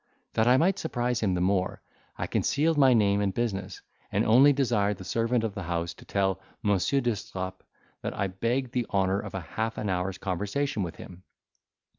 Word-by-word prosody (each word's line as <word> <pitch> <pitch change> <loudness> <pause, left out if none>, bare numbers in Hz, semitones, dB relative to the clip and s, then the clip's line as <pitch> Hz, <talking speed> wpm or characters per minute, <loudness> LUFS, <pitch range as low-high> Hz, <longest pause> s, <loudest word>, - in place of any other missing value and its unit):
That 110 +1 +2
I 125 +1 +6
might 180 +6 +2
surprise 120 -5 -1
him 95 -4 +1
the 90 - -1
more, 95 0 0 0.3
I - - -2
concealed 160 +3 +1
my 135 -3 +6
name 100 -2 +3
and 100 -1 +1
business, 100 -3 -3 0.3
and - - +1
only 130 +6 +7
desired 115 -8 +1
the 95 - -9
servant 115 +4 0
of 110 -3 -2
the 100 - -5
house 85 -1 -2
to - - -16
tell 95 -1 0 0.2
Monsieur 105 +7 +2
d'Estrapes 95 -5 -3 0.4
that - - -4
I 100 - +1
begged 115 +7 -1
the 125 -2 -1
honour 95 0 +2
of - - -7
half 110 +5 -3
an 105 - -2
hour's 90 +1 -1
conversation 105 +8 -2
with 85 -3 -3
him. 90 0 -11
105 Hz, 185 wpm, -28 LUFS, 95-120 Hz, 0.4 s, only